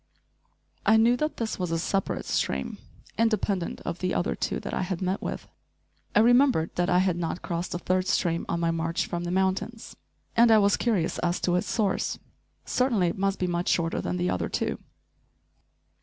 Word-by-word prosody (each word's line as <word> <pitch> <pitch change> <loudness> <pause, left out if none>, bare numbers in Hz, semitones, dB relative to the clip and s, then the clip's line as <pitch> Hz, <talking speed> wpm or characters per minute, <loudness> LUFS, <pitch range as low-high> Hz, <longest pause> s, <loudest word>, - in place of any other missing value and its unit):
I 220 +2 +5
knew 230 +2 +5
that 305 +2 -2
this 225 -3 -3
was 180 -2 -1
a 165 - 0
separate 195 +3 -1
stream, 65 0 -2 0.4
independent 210 -5 0
of 170 +1 -4
the 185 0 -1
other 175 - 0
two - - -2
that - - -6
I - - -1
had 180 -1 -2
met 185 +1 -1
with. - - -5 0.7
I 210 - +7
remembered 245 - +4
that 175 +1 +1
I 180 - +4
had 185 -2 +2
not 170 0 -3
crossed 175 0 -3
a - - 0
third 185 +1 0
stream 170 -4 +1
on 170 - 0
my 170 0 +1
march 165 0 -1
from 175 0 -4
the - - -3
mountains, 190 +5 -1 0.4
and 235 0 +6
I 220 - +7
was 200 -1 +4
curious 205 -9 0
as 175 0 0
to 175 - +1
its 180 - -1
source. 205 -5 0 0.5
Certainly 230 -9 +2
it - - -5
must 195 0 +1
be 185 - -1
much 175 0 -1
shorter 165 -1 +1
than 90 +1 -2
the 90 0 0
other 90 - -2
two. - - -2
185 Hz, 195 wpm, -27 LUFS, 170-210 Hz, 0.7 s, I